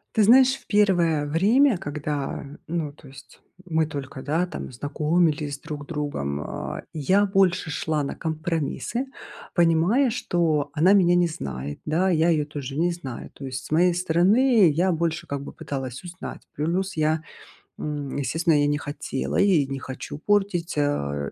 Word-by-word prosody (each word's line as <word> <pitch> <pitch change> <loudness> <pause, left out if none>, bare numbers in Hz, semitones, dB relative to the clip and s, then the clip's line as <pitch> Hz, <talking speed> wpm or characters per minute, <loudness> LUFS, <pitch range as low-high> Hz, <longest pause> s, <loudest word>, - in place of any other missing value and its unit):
Ты 220 - +5
знаешь, 260 +5 +6
в - - -16
первое 175 -7 +3
время, 210 - +3
когда, 145 -5 -4 0.2
ну, 160 -3 -2
то 145 0 -17
есть 130 -1 -15 0.2
мы 160 -3 +1
только, 140 -3 -6
да, 160 +5 +1
там 180 - -7
знакомились 150 +2 0
друг 145 -1 -7
с - - -27
другом, 145 - -3
а, - - -5
я 185 +7 +3
больше 190 -3 +2
шла 155 0 -1
на 140 - -3
компромиссы, 165 - -2 0.5
понимая, 175 +10 +3
что 170 - 0
она 165 +5 +4
меня 175 -3 +5
не 175 -1 +4
знает, 70 - -6
да, 170 +5 +1
я 165 -1 +3
ее 155 -3 +2
тоже 145 -2 -6
не 175 +2 +2
знаю. 140 -8 -7
То 140 - -9
есть 130 0 -5
с - - -12
моей 175 +3 +4
стороны 185 +5 +4
я 175 +5 +2
больше 165 0 -1
как 140 0 -4
бы - - -9
пыталась 130 -1 -5
узнать. 180 +2 -8
Плюс 175 +5 -1
я, 155 0 +1 0.6
м, 145 -2 -4
естественно, 160 +4 +1
я 145 - +3
не 145 - +1
хотела, 145 -2 -4
я 200 -1 +4
и 145 - +3
не 135 0 -4
хочу 130 +2 -7
портить, 195 -2 0
а 70 - -1
160 Hz, 165 wpm, -24 LUFS, 145-180 Hz, 0.6 s, знаешь